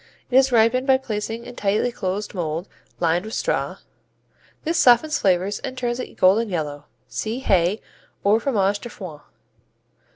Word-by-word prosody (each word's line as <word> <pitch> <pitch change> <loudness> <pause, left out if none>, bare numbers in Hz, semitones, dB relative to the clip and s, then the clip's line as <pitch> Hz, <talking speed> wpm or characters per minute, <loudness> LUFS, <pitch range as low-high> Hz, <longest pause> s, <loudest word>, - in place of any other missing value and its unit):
It - - 0
is 265 0 +5
ripened 240 +3 +3
by 265 -1 +6
placing 225 -1 -4
in 245 - -9
tightly 210 +4 +1
closed 195 -2 -3
mold, 170 -1 -3 0.3
lined 170 +1 +2
with 220 +1 -6
straw. - - -1 0.9
This 330 +1 0
softens, 255 +5 +5
flavors, 190 +2 +1
and 260 -2 -6
turns 240 -1 -2
it - - -5
golden 210 +5 +4
yellow. 150 -5 -3 0.2
(See 220 +2 -3
Hay 190 -2 +2 0.4
or 210 +2 +4
Fromage 205 -5 +1
de 240 - -8
Foin.) 180 -9 -9
215 Hz, 155 wpm, -23 LUFS, 185-245 Hz, 0.9 s, by